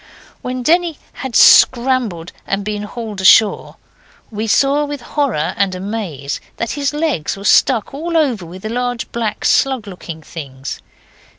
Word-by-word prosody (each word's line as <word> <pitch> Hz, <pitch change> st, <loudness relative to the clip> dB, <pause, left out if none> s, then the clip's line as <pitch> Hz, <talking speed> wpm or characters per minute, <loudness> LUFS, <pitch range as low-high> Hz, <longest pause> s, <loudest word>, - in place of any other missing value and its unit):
When 250 Hz, 0 st, -4 dB
Denny 335 Hz, +1 st, +2 dB, 0.2 s
had 265 Hz, -4 st, -6 dB
scrambled 240 Hz, -9 st, +4 dB, 0.2 s
and 195 Hz, 0 st, -2 dB
been 210 Hz, -1 st, -3 dB
hauled 210 Hz, -1 st, -6 dB
ashore, 205 Hz, +2 st, +4 dB, 0.6 s
we 215 Hz, +1 st, -3 dB
saw 280 Hz, +6 st, +3 dB
with 290 Hz, -2 st, -5 dB
horror 245 Hz, -, -1 dB
and 195 Hz, -2 st, +1 dB
amaze 185 Hz, -8 st, -5 dB, 0.2 s
that 230 Hz, -, -2 dB
his 280 Hz, -1 st, -1 dB
legs 295 Hz, -, -2 dB
were 200 Hz, -, -9 dB
stuck 230 Hz, +3 st, +3 dB
all 330 Hz, +4 st, -2 dB
over 260 Hz, -, +1 dB
with 180 Hz, +4 st, -10 dB
large 245 Hz, +1 st, -3 dB
black, 230 Hz, -2 st, -3 dB
slug 265 Hz, -5 st, +2 dB
looking 170 Hz, -5 st, -9 dB
things. 135 Hz, -4 st, -8 dB
225 Hz, 140 wpm, -17 LUFS, 190-270 Hz, 0.6 s, scrambled